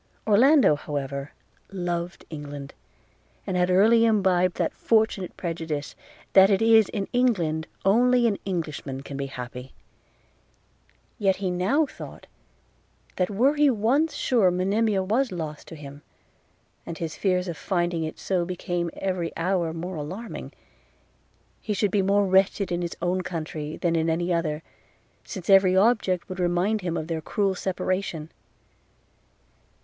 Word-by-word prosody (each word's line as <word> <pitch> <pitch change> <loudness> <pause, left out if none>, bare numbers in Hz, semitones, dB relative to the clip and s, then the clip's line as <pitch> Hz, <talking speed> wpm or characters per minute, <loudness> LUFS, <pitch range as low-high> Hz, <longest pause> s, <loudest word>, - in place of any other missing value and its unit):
Orlando, 245 - +5
however, 140 0 -5 0.4
loved 175 -2 -4
England, 145 -2 -7 0.7
and 185 - -3
had 180 0 +2
early 220 +5 +5
imbibed 190 -5 +3
that - - 0
fortunate 220 -4 0
prejudice, 160 -4 -4 0.4
that 190 0 +7
it 195 -2 +3
is 225 -2 +5
in 200 -2 -3
England 175 -11 +1 0.2
only 245 +4 +4
an 210 -4 +1
Englishman 150 -7 -4
can 140 - -8
be 140 0 -3
happy; 125 0 -8 1.5
yet 195 -3 +3
he 190 -2 -2
now 195 - +2
thought, - - -11 0.9
that 180 - +1
were 240 +8 +3
he 295 -1 +4
once 265 +7 +1
sure 225 -8 +3
Monimia 195 +3 +1
was 235 +7 0
lost 155 -4 -6
to - - -9
him 145 -1 -10 0.8
(and 165 - -7
his 165 -2 -4
fears 185 -2 0
of 170 - -4
finding 175 -2 -1
it 155 - -5
so 185 -3 -1
became 175 -1 -3
every 185 -3 -2
hour 175 -1 0
more 170 +2 -5
alarming), 185 +10 -6 1.1
he 210 - -2
should 200 0 +1
be 205 - +2
more 200 +1 +3
wretched 190 +1 +2
in 175 0 -1
his 170 -1 -4
own 180 +1 +1
country 155 -3 -5
than 170 -1 0
in 165 0 +1
any 175 +2 0
other, 160 -2 -1 0.6
since 190 -5 -8
every 190 -1 +5
object 195 -4 +2
would 185 0 -7
remind 180 +5 +1
him 175 -2 -2
of 155 - -3
their 160 -1 -3
cruel 195 +4 0
separation. 185 -3 -3
180 Hz, 145 wpm, -25 LUFS, 165-205 Hz, 1.5 s, that